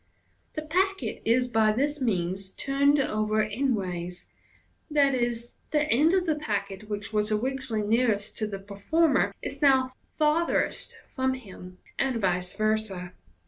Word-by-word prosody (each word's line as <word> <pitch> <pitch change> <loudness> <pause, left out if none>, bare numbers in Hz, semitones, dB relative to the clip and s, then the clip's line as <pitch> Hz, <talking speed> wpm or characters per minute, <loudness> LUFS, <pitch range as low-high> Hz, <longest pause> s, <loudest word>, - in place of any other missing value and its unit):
The 310 - -4
packet 380 +5 0
is 245 +2 +3
by 220 -2 +3
this 290 +5 0
means 190 -4 -1
turned 280 +1 +2
over 215 -4 +1
endways, 190 -7 -2 0.7
i.e., 260 -5 +3 0.4
that 300 -1 +2
end 310 +9 +4
of 370 -2 +2
the 320 - +2
packet 200 -3 -3
which 205 +1 -4
was 210 0 +1
originally 230 -1 -1
nearest 220 -2 +1
to 215 - 0
the 200 -2 -4
per 200 +1 -11
former 320 +8 +3
is - - -5
now 265 -2 +4 0.2
farthest 310 +2 +1 0.2
from 260 0 +1
him, 185 -6 -11 0.2
and 260 -3 +1
vice 180 -2 0
versa. 215 -4 -1
225 Hz, 140 wpm, -27 LUFS, 205-275 Hz, 0.7 s, end